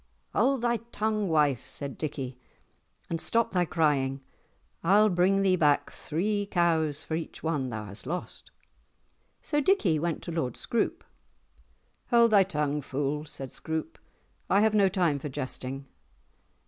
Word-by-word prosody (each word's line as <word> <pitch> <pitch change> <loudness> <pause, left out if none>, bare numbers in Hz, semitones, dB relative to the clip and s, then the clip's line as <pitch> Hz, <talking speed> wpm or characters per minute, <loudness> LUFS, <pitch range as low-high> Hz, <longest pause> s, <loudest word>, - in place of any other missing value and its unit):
"Hold 255 +3 +2
thy 235 -1 +2
tongue, 215 -2 0
wife," 145 -6 +2
said 140 +1 -4
Dickie, 135 -5 -5 0.7
"and 165 -1 -3
stop 230 0 +1
thy 180 -2 +2
crying. 140 -5 +1 0.6
I'll 205 +5 +5
bring 190 +2 +3
thee 190 -1 +4
back 145 -3 +2
three 205 +5 -2
cows 160 -5 +1
for - - -6
each 160 0 -4
one 145 -5 -1
that 115 - -4
thou - - -8
hast 100 +5 -9
lost." 180 +4 -5 0.9
So 295 - +1
Dickie 225 - +3
went 170 0 -2
to - - -5
Lord 135 -8 -2
Scroope. 235 - -1 1.1
"Hold 235 -2 +5
thy 205 -2 +7
tongue, 150 -5 -1
fool," 145 +2 -2
said 135 -3 -7
Scroope. 160 - -4 0.5
"I 200 - +4
have 220 0 +3
no 200 -2 +4
time 175 -7 +1
for 145 - -5
jesting." 130 +1 -5
160 Hz, 150 wpm, -28 LUFS, 145-200 Hz, 1.1 s, thy